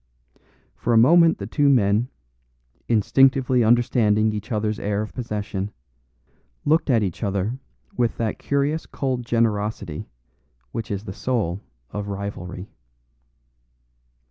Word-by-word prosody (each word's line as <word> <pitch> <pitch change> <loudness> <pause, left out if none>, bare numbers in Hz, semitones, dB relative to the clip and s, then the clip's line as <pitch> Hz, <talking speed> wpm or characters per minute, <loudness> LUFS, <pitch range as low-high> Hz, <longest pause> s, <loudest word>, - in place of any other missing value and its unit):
For 120 - -1
a - - +5
moment 165 +8 +6
the 100 - -5
two 140 +7 +2
men, 115 -1 +3 0.8
instinctively 130 +2 +3
understanding 110 -2 +3
each 105 +3 -6
other's 105 -1 -1
air 105 +1 -1
of 110 - -8
possession, 105 -4 -4 1.0
looked 155 +1 +2
at 115 -4 +3
each 95 -4 -3
other 100 +4 -1 0.4
with 120 -2 0
that 110 -2 -2
curious 140 +3 -1
cold 130 -3 -2
generosity 105 -7 -1 0.6
which 115 0 -5
is 100 -1 -3
the 95 - -7
soul 100 -6 -1 0.3
of 105 0 -4
rivalry. 100 -2 -6
110 Hz, 115 wpm, -23 LUFS, 100-125 Hz, 1.0 s, moment